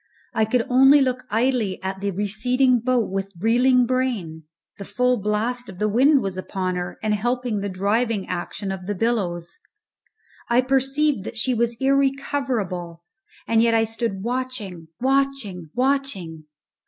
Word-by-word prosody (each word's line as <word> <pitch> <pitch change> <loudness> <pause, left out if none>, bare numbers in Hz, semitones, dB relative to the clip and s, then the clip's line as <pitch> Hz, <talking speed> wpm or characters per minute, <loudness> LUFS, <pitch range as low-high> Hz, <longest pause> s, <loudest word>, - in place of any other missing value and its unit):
I 220 -2 +2
could 230 +2 +1
only 270 +3 +6
look 255 -2 0
idly 225 -3 0
at 190 0 -4
the 200 - -1
receding 240 +6 +1
boat 245 -3 0
with 195 0 -3
reeling 245 +4 +4
brain. 230 -11 -2 0.3
The - - -5
full 250 +5 +1
blast 225 +4 -1
of 190 - -10
the 210 - 0
wind 265 +6 +4
was 190 -1 -3
upon 185 -1 -3
her, 180 0 -4
and 215 -1 +1
helping 240 +1 -1
the 200 0 -3
driving 205 +2 0
action 185 +2 -4
of 190 -1 -6
the 205 - -2
billows. 185 - -2 0.9
I 240 +1 +4
perceived 270 -1 +1
that 230 - -5
she 255 +3 +1
was 235 0 0
irrecoverable, 265 -11 -1 0.4
and 225 -1 +3
yet 230 0 +3
I 225 - +4
stood 225 -3 -3
watching, 235 -9 -4
watching, 265 - -1
watching! 250 - -1
230 Hz, 150 wpm, -23 LUFS, 195-255 Hz, 0.9 s, only